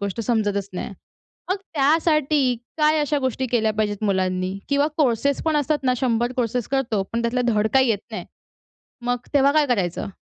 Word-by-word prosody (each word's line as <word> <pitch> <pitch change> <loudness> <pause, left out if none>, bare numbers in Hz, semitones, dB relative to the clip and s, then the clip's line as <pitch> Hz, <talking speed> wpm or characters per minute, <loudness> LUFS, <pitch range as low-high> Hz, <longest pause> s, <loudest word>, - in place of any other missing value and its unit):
गोष्ट 200 +3 -3
समजतचं 205 -4 0
नाही. 200 - -4 0.6
मग 375 - +2 0.2
त्यासाठी 295 -2 +2 0.2
काय 305 +1 +3
अशा 295 0 0
गोष्टी 260 -1 -1
केल्या 220 -2 +2
पाहिजेत 210 -1 -1
मुलांनी? 185 -1 0
किंवा 285 +1 +2
कोर्सेस 280 -1 +1
पण 315 -2 +2
असतात 295 +1 +1
ना, 255 - +3
100 240 0 0
कोर्सेस 240 -1 -1
करतो. 235 -7 0
पण 235 0 -1
त्यातलं 240 +2 0
धड 215 -2 +2
काही 265 -1 +5
येत 205 - +1
नाही. 220 - -5 0.8
मग 245 0 0 0.2
तेव्हा 280 0 +5
काय 300 -1 +3
करायचं? 195 -8 -1
245 Hz, 170 wpm, -22 LUFS, 215-280 Hz, 0.8 s, काही